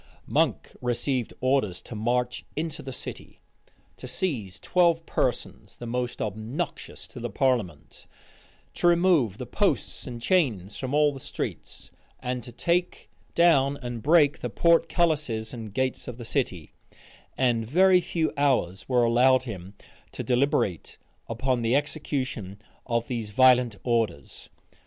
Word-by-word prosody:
Monk - - 0
received 125 0 -1
orders 130 -8 +1
to - - -10
march 120 +3 -1
into 160 0 -3
the 135 - -7
city; - - -8 0.6
to - - -8
seize 110 - -2
twelve 170 - +2
persons, 110 -7 -2
the 120 - -9
most 125 +1 -2
obnoxious 110 - -5
to 125 - -10
the 120 0 -4
parliament; 115 - -1 0.7
to - - +1
remove 170 - +3
the - - -5
posts - - -1
and 120 -2 -6
chains 115 - +1
from 130 +1 -3
all 150 -1 +4
the 135 - -8
streets; - - -6 0.3
and 125 -1 -3
to 120 - -9
take 175 +8 -1 0.2
down 145 -5 +4
and 120 -4 -6
break 150 +1 +4
the 125 - -3
portcullises 155 -7 +2
and 110 -3 -7
gates 130 -1 -1
of 125 - -6
the 120 - -8
city; 95 - -2 0.6
and 120 -4 +1
very 180 +6 +5
few 165 -2 -1
hours 130 - 0
were 125 -2 +3
allowed 125 +3 +4
him 100 -5 -8 0.4
to - - -5
deliberate 125 - 0 0.3
upon 125 +2 0
the 115 +2 +2
execution 135 -9 -2 0.3
of 115 -1 0
these 115 -4 -3
violent 125 -1 +5
orders. 115 -3 -2
125 Hz, 140 wpm, -26 LUFS, 115-145 Hz, 0.7 s, very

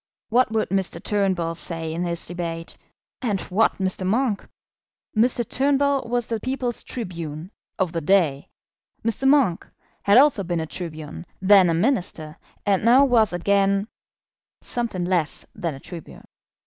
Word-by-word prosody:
What 245 0 +3
would 220 -1 0
Mr. 190 -3 -1
Turnbull 190 -5 0
say 165 -1 -4
in 170 - -3
this 170 -1 -2
debate, 170 -1 -5 0.5
and 210 -6 0
what 215 +4 +2
Mr. 190 0 -2
Monk? 215 +2 0 0.7
Mr. 240 0 +2
Turnbull 280 -1 +1
was 240 -1 0
the 225 -1 -2
people's 255 0 -3
tribune, 170 -6 -6 0.3
of 190 -4 0
the 165 -1 -3
day; 160 -5 +2 0.6
Mr. 230 +4 0
Monk 270 - +3 0.3
had 200 +3 +5
also 270 -7 +5
been 175 -2 -2
a 160 - -2
tribune, 155 - -7
then 190 -1 +6
a 165 - +2
Minister, 170 - -1 0.3
and 200 -2 +2
now 250 +5 +6
was 230 -5 +3
again 195 +3 +1 0.8
something 225 -7 -2
less 175 -4 -1
than 170 -8 -3
a - - -10
tribune. 170 +2 -10
195 Hz, 145 wpm, -23 LUFS, 170-235 Hz, 0.8 s, then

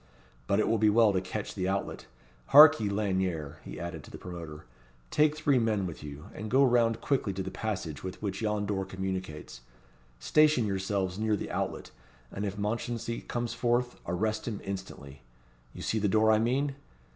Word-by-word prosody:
But 100 - +2
it - - +2
will 115 - +2
be 110 0 +5
well 110 -1 +5
to 95 - +2 0.2
watch 105 - -3
the 95 -2 -2
outlet. 100 +1 -3 0.4
Hark 150 0 +9
ye, 105 -2 -1
Lanyere," 95 -7 -1
he 60 - -8
added 85 -3 -6
to - - -13
the - - -9
promoter, 85 -4 -8 0.5
"take 150 0 +3
three 145 -4 +3
men 110 -4 +1
with 85 - -6
you, 75 0 -9
and 110 +1 -6
go 135 +4 +5
round 115 -2 +2
quickly 130 -8 0
to 95 0 -3
the 95 - -5
passage 95 -9 -4
with 95 -1 -6
which 100 -1 -4
yon 105 -1 0
door 100 -1 -1
communicates. 95 -9 -5 0.6
Station 150 - +3
yourselves 95 -1 -1
near 110 -1 +1
the - - -5
outlet; - - -3 0.4
and 100 - -4
if 100 +1 -5
Mounchensey 115 +2 -3
comes 120 -1 -2
forth, 120 0 0
arrest 110 +6 -1
him 110 -4 -3
instantly. 95 -8 -7 0.5
You - - -9
see 110 - 0
the 105 - +1
door 110 +2 +4
I 110 - +4
mean? 135 +5 +1
105 Hz, 185 wpm, -29 LUFS, 95-115 Hz, 0.6 s, Hark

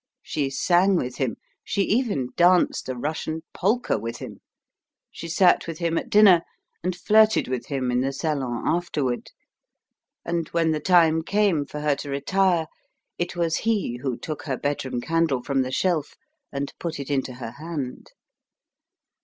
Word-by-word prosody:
She 140 -3 -2
sang 180 +7 +3
with 125 -7 -2
him, 130 -4 -1 0.3
she 200 - 0
even 205 - 0
danced 175 -5 +3
a 130 - -2
Russian 155 +4 -3
polka 220 +6 +1
with 115 0 -5
him; - - -9 0.7
she 170 - -8
sat 180 +2 +3
with 165 -2 -5
him 170 -1 -1
at - - -2
dinner, 200 -5 +7 0.4
and 180 0 -1
flirted 215 +4 +4
with 125 -2 -3
him 130 -3 -1
in 125 0 +1
the 135 +1 0
salon 135 -4 -2
afterward; 150 -7 -1 1.0
and 170 -2 -1
when 165 -1 +1
the 155 - 0
time 165 -1 +4
came 190 -5 +1
for 150 - -6
her 150 -1 +2
to 145 - -7
retire, 170 +5 +1 0.5
it 175 +1 -2
was 170 -2 0
he 210 - 0
who 125 -1 -3
took 155 -2 -5
her 135 -4 -2
bedroom 135 -3 -2
candle 160 -4 +1
from 135 -1 +1
the 130 0 -2
shelf 160 +1 0 0.4
and 140 0 -4
put 165 -4 -4
it 140 +1 -5
into 135 -2 -1
her 120 -2 -7
hand. 150 -6 -5
160 Hz, 160 wpm, -24 LUFS, 135-175 Hz, 1.0 s, dinner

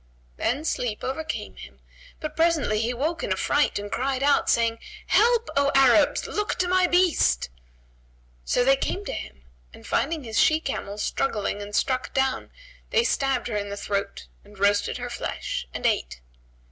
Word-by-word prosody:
Then 280 +7 -1
sleep 235 -8 -2
overcame 310 +5 -4
him, - - -12 0.4
but 310 -1 -5
presently 320 -10 +2
he 230 - 0
awoke 290 +7 -2
in - - -2
affright 290 0 +1
and 205 0 -6
cried 265 +1 -1
out, 285 0 +3
saying, 230 -1 +2 0.3
"Help, 470 +1 +3
O 280 0 +3
Arabs! 270 +2 +4
Look 420 0 -2
to 360 - 0
my 365 0 +3
beast!" 350 - +2 0.9
So 245 - +1
they 270 +1 +6
came 385 +8 -3
to - - -4
him, 65 0 -8 0.3
and - - -15
finding 310 +1 -1
his 225 -2 -1
she 310 0 +4
camel 210 -9 -4
struggling 210 -2 -1
and 205 0 -6
struck 260 -2 0
down, 265 -1 0 0.4
they 465 -2 +3
stabbed 270 - 0
her 230 - -3
in 205 0 -3
the 200 - -5
throat 200 0 -3 0.2
and 205 0 -17
roasted 205 +1 +2
her - - -6
flesh - - -4
and - - -6
ate. - - 0
265 Hz, 170 wpm, -25 LUFS, 210-315 Hz, 0.9 s, they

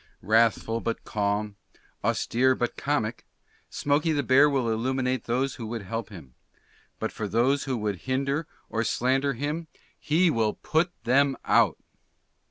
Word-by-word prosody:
Wrathful 115 +2 +2
but 115 - -3
Calm. 105 0 -2 0.5
Austere 130 +2 +2
but 120 - -2
Comic. 130 -6 -2 0.5
Smokey 145 +3 +1
the 145 -1 0
Bear 135 +4 +5
will 135 -4 0
Illuminate 125 +2 -1
those 130 +3 -1
who 110 - -4
would 115 -1 -5
help 115 +2 -4
him; 80 -11 -12 0.6
but - - -3
for 105 - -4
those 125 +7 +2
who 130 -3 -1
would 105 -3 -2
hinder 140 +4 0 0.2
or 115 0 -1
slander 135 +4 +1
him, 150 +6 -3 0.3
HE 165 +3 +3
WILL 110 -5 +1
PUT 160 +3 0
THEM 135 +2 +3
OUT. - - +4
125 Hz, 145 wpm, -26 LUFS, 110-140 Hz, 0.6 s, Bear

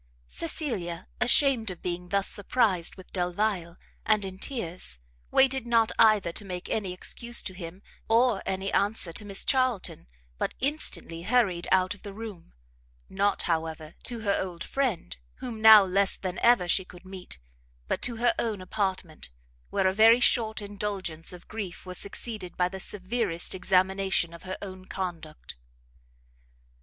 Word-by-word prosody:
Cecilia, 175 - -3
ashamed 245 -4 +4
of 180 -2 -8
being 180 0 -4
thus 200 0 +1
surprised 205 -5 +2
with 185 - -14
Delvile, 180 -1 -1 0.3
and 215 -2 +2
in 190 0 -6
tears, 180 - -4 0.3
waited 265 -2 +3
not 230 -2 +3
either 215 -6 +5
to 205 - -5
make 180 -2 -6
any 200 -4 -1
excuse 235 +6 -2
to 190 - -5
him, 180 +1 -9 0.3
or 230 -2 +4
any 190 +1 -2
answer 200 -4 +1
to 210 - -3
Miss 200 -1 -1
Charlton, 255 - 0 0.3
but - - -2
instantly 270 - -1
hurried 190 -5 +1
out 185 +1 +3
of 205 - -16
the 200 -2 -8
room; 210 - -9 0.6
not, 200 +1 +1
however, 160 -1 -2
to 235 -3 -3
her 200 -2 +1
old 175 -3 -5
friend, 245 - -2 0.2
whom 225 -3 -6
now 220 -2 +10
less 195 +1 +1
than 185 -1 -4
ever 235 -7 +4
she 190 +2 +3
could 180 0 -15
meet, 185 - -8 0.5
but - - -1
to 245 -1 -1
her 235 +1 +3
own 220 -4 -1
apartment, 185 - -2 0.4
where - - 0
a 190 - +3
very 225 +3 +7
short 220 -3 +2
indulgence 200 -5 -3
of 180 -1 -11
grief 200 -6 -6
was 180 -1 -5
succeeded 200 -2 -4
by 180 - +3
the 190 +1 -7
severest 190 -2 0
examination 190 -1 +2
of 170 - -11
her 185 - -3
own 185 -1 -8
conduct. 170 - -6
195 Hz, 155 wpm, -28 LUFS, 180-220 Hz, 0.6 s, now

